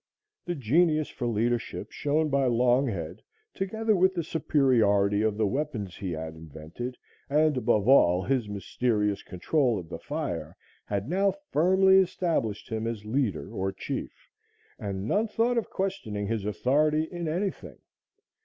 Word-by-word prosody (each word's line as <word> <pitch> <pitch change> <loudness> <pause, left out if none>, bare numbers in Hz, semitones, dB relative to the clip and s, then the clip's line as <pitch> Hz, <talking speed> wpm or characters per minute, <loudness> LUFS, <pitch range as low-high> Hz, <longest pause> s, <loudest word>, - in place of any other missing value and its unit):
The 175 - -2
genius 155 +4 +2
for 120 - -4
leadership 115 +1 -1
shown 155 +1 0
by 140 -1 +2
Longhead, 120 - +1 0.3
together 220 +3 0
with 190 +1 +3
the 170 - -1
superiority 110 -11 +2
of 110 -1 0
the 110 - +2
weapons 115 - -3
he 95 -3 -4
had 80 0 -5
invented, 80 - -8 0.3
and, 150 +1 +3
above 120 -4 +1
all, 90 -9 +5
his 125 -2 0
mysterious 105 +1 -1
control 120 - 0
of 85 -3 -7
the - - -6
fire, - - -4 0.3
had 100 +1 -3
now 195 +5 +1 0.2
firmly 190 +4 +5
established 160 - -1
him 110 0 -3
as 110 -3 -4
leader 110 - -1
or 95 +1 -1
chief, - - -6 0.5
and 100 0 -4
none 210 - +1
thought 235 +3 +1
of 225 - -7
questioning 150 - -3
his 110 -1 -2
authority 150 +8 +2
in 170 +1 -5
anything. 185 +5 -3
125 Hz, 145 wpm, -27 LUFS, 105-160 Hz, 0.5 s, all